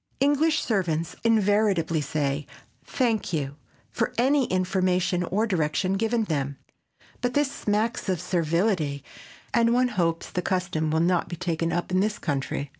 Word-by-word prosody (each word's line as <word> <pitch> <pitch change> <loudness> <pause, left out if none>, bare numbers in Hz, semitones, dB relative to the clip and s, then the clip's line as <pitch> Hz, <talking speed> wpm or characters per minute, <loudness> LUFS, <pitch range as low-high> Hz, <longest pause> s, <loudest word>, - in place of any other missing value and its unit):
English 290 +3 +3
servants 170 -7 -1
invariably 205 -7 +2
say 145 0 -2 0.4
"Thank 230 -8 -1
you" 145 -2 -2 0.3
for 235 - -1
any 265 +3 +3
information 185 -1 +1
or 195 +5 0
direction 185 -1 0
given 225 +3 +1
them, 140 -7 -2 0.6
but 245 0 -1
this 290 -1 +2
smacks 215 -4 -1
of 185 -3 0
servility 170 -4 0 0.5
and 230 0 +3
one 250 0 +3
hopes 170 -6 -1
the 180 - -1
custom 180 -4 -1
will 160 +1 +1
not 175 0 +1
be 175 - -4
taken 165 -1 -1
up 175 +2 -2
in 185 - +2
this 210 +2 0
country. 140 -1 -2
185 Hz, 145 wpm, -26 LUFS, 160-220 Hz, 0.6 s, English